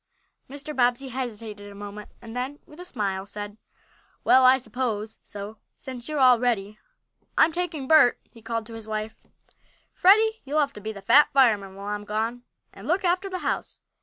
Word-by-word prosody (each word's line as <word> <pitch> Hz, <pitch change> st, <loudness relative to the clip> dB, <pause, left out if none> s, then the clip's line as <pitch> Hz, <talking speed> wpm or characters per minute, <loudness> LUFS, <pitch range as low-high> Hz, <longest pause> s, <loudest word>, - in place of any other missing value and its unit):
Mr. 290 Hz, +2 st, -7 dB
Bobbsey 245 Hz, +1 st, +1 dB
hesitated 220 Hz, -5 st, -6 dB
a -, -, -12 dB
moment, 205 Hz, +1 st, -8 dB
and 225 Hz, 0 st, -9 dB
then, 260 Hz, +3 st, -3 dB
with 300 Hz, -, -16 dB
a 360 Hz, -, -8 dB
smile, 195 Hz, -, -2 dB
said: 205 Hz, +1 st, -7 dB, 0.6 s
"Well, 260 Hz, -, +6 dB
I 255 Hz, +1 st, +7 dB
suppose 220 Hz, -3 st, -3 dB
so, 205 Hz, +1 st, -8 dB, 0.2 s
since 255 Hz, 0 st, -7 dB
you 305 Hz, -, -3 dB
are -, -, 0 dB
all 255 Hz, -3 st, +6 dB
ready. 215 Hz, -4 st, -1 dB, 0.6 s
I'm 320 Hz, -, +6 dB
taking 320 Hz, -5 st, -3 dB
Bert," 310 Hz, -5 st, +6 dB
he 230 Hz, -, -16 dB
called 230 Hz, 0 st, -3 dB
to 230 Hz, -, -11 dB
his 225 Hz, -1 st, -9 dB
wife. 215 Hz, 0 st, -3 dB, 0.8 s
"Freddie, 440 Hz, +4 st, +4 dB
you'll 290 Hz, +3 st, 0 dB
have 280 Hz, -2 st, +1 dB
to 210 Hz, -, -10 dB
be 215 Hz, +2 st, -4 dB
the 200 Hz, -2 st, -10 dB
Fat 295 Hz, +9 st, +6 dB
Fireman 210 Hz, -8 st, +3 dB
while 200 Hz, +1 st, -9 dB
I'm 205 Hz, 0 st, -4 dB
gone, 225 Hz, +3 st, -2 dB, 0.3 s
and -, -, -11 dB
look 360 Hz, +4 st, +1 dB
after 365 Hz, +3 st, +1 dB
the 370 Hz, -, -3 dB
house." -, -, -3 dB
240 Hz, 190 wpm, -25 LUFS, 210-280 Hz, 0.8 s, I